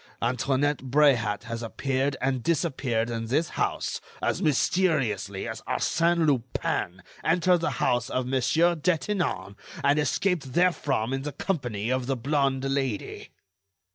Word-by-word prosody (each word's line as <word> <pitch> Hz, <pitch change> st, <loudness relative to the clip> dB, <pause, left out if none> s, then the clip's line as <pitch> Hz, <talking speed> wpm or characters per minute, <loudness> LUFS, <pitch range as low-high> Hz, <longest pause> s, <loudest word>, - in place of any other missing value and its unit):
Antoinette 130 Hz, +4 st, +1 dB
Bréhat 120 Hz, -8 st, +3 dB
has 115 Hz, -1 st, -5 dB
appeared 135 Hz, +4 st, -1 dB
and 130 Hz, -1 st, 0 dB
disappeared 130 Hz, -7 st, 0 dB
in 115 Hz, -1 st, -3 dB
this 150 Hz, +8 st, +1 dB
house -, -, -2 dB, 0.2 s
as -, -, -1 dB
mysteriously 135 Hz, -, +1 dB
as -, -, -5 dB
Arsène 170 Hz, 0 st, +2 dB
Lupin 125 Hz, -, -1 dB, 0.2 s
entered 175 Hz, +2 st, +3 dB
the 165 Hz, -, 0 dB
house 120 Hz, 0 st, +1 dB
of 130 Hz, 0 st, -1 dB
Monsieur 135 Hz, +7 st, +2 dB
Detinan 165 Hz, -, -1 dB, 0.3 s
and 140 Hz, +2 st, +4 dB
escaped 150 Hz, -1 st, 0 dB
therefrom 145 Hz, -9 st, +1 dB
in 135 Hz, -, -1 dB
the 145 Hz, +2 st, -4 dB
company 120 Hz, -, -2 dB
of 130 Hz, -1 st, -1 dB
the 135 Hz, -1 st, 0 dB
blonde 135 Hz, +1 st, 0 dB
lady." 135 Hz, -5 st, -2 dB
135 Hz, 130 wpm, -26 LUFS, 120-155 Hz, 0.3 s, and